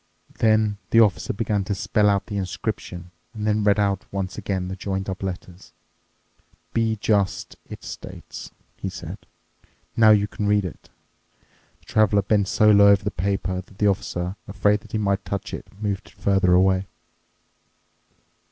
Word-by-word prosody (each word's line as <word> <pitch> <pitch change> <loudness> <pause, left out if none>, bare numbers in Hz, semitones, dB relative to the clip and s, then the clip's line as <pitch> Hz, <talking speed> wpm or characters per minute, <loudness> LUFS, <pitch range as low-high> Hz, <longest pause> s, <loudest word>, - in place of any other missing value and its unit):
Then 110 -2 +3
the 115 - +5
Officer 105 -7 +3
began 105 -1 -1
to 100 0 -1
spell 105 +1 +2
out 100 -1 +1
the 105 - -6
inscription 90 -1 -4 0.2
and 105 -1 -4
then 105 0 +1
read 100 0 +3
out 100 -2 +1
once 95 -1 -3
again 95 -3 -3
the 95 - -4
joined 95 0 -3
up 95 -1 -4
letters. 95 -1 -7 1.0
"'Be 115 -1 +1
just!' 100 -2 0
it - - -9
states," - - -9 0.3
he - - -4
said. - - -8 0.8
"Now 110 -1 +6
you 105 -1 +5
can 105 +1 -3
read 105 -1 +3
it." 90 - -9 0.9
The - - -27
Traveler 105 -2 +3
bent 100 -1 +2
so 105 +3 +4
low 100 -1 +7
over 100 0 +5
the 105 - -1
paper 95 -1 -1
that 95 +1 -20
the 105 - +1
Officer, 95 -1 -1
afraid 105 +1 +2
that 110 +1 -18
he - - +1
might 100 -2 0
touch 100 +3 -4
it, - - -6
moved 100 -2 -3
it - - -18
further 95 -2 +2
away. 95 +1 +3
100 Hz, 165 wpm, -23 LUFS, 95-105 Hz, 1.0 s, low